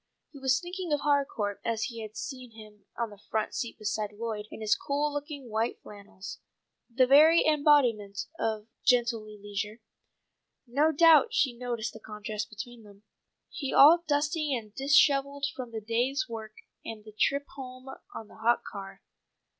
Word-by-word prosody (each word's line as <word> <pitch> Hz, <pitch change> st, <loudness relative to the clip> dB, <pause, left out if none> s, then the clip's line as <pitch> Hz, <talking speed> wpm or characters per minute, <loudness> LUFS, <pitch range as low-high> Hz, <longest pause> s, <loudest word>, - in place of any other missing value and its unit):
He 280 Hz, -, -12 dB
was 265 Hz, 0 st, +2 dB
thinking 355 Hz, -1 st, -6 dB
of 295 Hz, -1 st, +1 dB
Harcourt 275 Hz, -9 st, 0 dB
as 225 Hz, -1 st, -1 dB
he 230 Hz, -3 st, -5 dB
had 215 Hz, 0 st, -8 dB
seen 255 Hz, -4 st, -7 dB
him 215 Hz, -2 st, -15 dB
on 235 Hz, -2 st, -2 dB
the 205 Hz, -, -13 dB
front 215 Hz, +1 st, -3 dB
seat 235 Hz, -2 st, -4 dB
beside 215 Hz, -1 st, -2 dB
Lloyd, 210 Hz, -1 st, -5 dB
in -, -, -9 dB
his 215 Hz, -1 st, +2 dB
cool 290 Hz, +1 st, -1 dB
looking 290 Hz, -2 st, -6 dB
white 225 Hz, +1 st, -1 dB
flannels, 200 Hz, -1 st, -10 dB, 0.5 s
the 255 Hz, +2 st, +3 dB
very 305 Hz, +5 st, +6 dB
embodiment 265 Hz, -10 st, +3 dB
of 215 Hz, -1 st, -1 dB, 0.2 s
gentlemanly 235 Hz, -4 st, +1 dB
leisure. 205 Hz, +2 st, -5 dB, 0.9 s
No 285 Hz, +6 st, +2 dB
doubt 330 Hz, -, +6 dB
she 260 Hz, -4 st, +2 dB
noticed 235 Hz, -2 st, -4 dB
the 220 Hz, -, -10 dB
contrast 210 Hz, 0 st, -5 dB
between 235 Hz, +2 st, -9 dB
them, 205 Hz, -1 st, -17 dB, 0.5 s
he 275 Hz, -3 st, -4 dB
all 330 Hz, +5 st, +8 dB
dusty 300 Hz, 0 st, +1 dB
and 215 Hz, -4 st, -7 dB
dishevelled 280 Hz, 0 st, +3 dB
from 250 Hz, -3 st, -6 dB
his 220 Hz, -2 st, -6 dB
day's 250 Hz, +7 st, 0 dB
work 220 Hz, -2 st, -7 dB, 0.3 s
and 220 Hz, -2 st, -8 dB
the 215 Hz, -, -11 dB
trip 280 Hz, +6 st, +1 dB
home 255 Hz, -1 st, -10 dB, 0.3 s
on 220 Hz, -, -7 dB
the -, -, -16 dB
hot 230 Hz, +2 st, +2 dB
car. 195 Hz, -1 st, -9 dB
235 Hz, 160 wpm, -29 LUFS, 215-280 Hz, 0.9 s, all